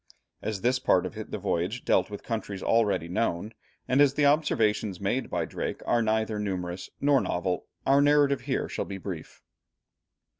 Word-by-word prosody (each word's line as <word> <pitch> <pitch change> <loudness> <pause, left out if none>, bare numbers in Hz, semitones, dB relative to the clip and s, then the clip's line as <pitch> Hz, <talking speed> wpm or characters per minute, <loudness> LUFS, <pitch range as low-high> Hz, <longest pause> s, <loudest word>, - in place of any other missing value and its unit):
As 105 -3 -3
this 125 +3 +2
part - - +3
of - - -5 0.2
the - - -3
voyage 90 +9 -2
deals - - +3
with 105 - -7
countries 105 -4 -4
already 105 -7 +2
known, 95 +2 -1 0.3
and 130 +3 +3
as 140 -1 +4
the 150 - +3
observations 110 - +2
made 100 +7 -1
by - - -1
Drake - - -4
are 120 - +2
neither 110 -1 0
numerous 90 -3 -4
nor 140 -1 +4
novel, 90 0 -2 0.2
our 140 +1 +5
narrative 145 -2 +4
here 130 +1 -1
shall - - -3
be 100 - -6
brief. 90 -4 -8
110 Hz, 165 wpm, -27 LUFS, 95-130 Hz, 0.3 s, our